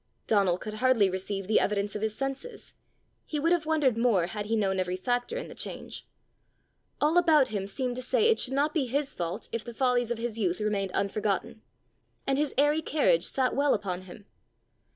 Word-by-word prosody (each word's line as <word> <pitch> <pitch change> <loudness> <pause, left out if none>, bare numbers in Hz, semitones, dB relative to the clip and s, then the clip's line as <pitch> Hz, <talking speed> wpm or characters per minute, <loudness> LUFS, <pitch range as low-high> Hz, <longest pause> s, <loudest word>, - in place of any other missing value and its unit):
Donal 195 -5 +2
could 215 +2 -7
hardly 220 -4 +3
receive 195 +1 -3
the 215 +3 +3
evidence 205 0 -1
of 210 - -3
his 215 0 -1
senses: 275 - -5 0.5
he 300 - -4
would 330 +3 +1
have 340 -3 +1
wondered 285 -7 +2
more 225 -8 +3
had 205 +3 -5
he 225 - +1
known 195 -3 +1
every 180 0 -1
factor 245 - -2
in - - -5
the - - -10
change. - - -7 0.9
All 315 +4 +4
about 310 -6 +4
him 200 -3 -3
seemed 245 +4 -2
to - - -3
say 255 - +2
it 455 - +3
should 260 - 0
not 295 +2 +1
be 285 -6 0
his 280 +3 -1
fault 170 0 -4
if 230 -1 -3
the 235 -1 -9
follies 245 -2 +1
of 240 - -1
his 230 -1 -4
youth 180 -3 0
remained 205 -3 -1
unforgotten; 210 +2 -1 0.6
and 270 0 +1
his 295 -2 0
airy 295 +3 +3
carriage 315 +12 +2
sat 260 -2 +1
well 285 +1 +3
upon 185 -2 -4
him. 185 +3 -13
235 Hz, 200 wpm, -28 LUFS, 200-280 Hz, 0.9 s, All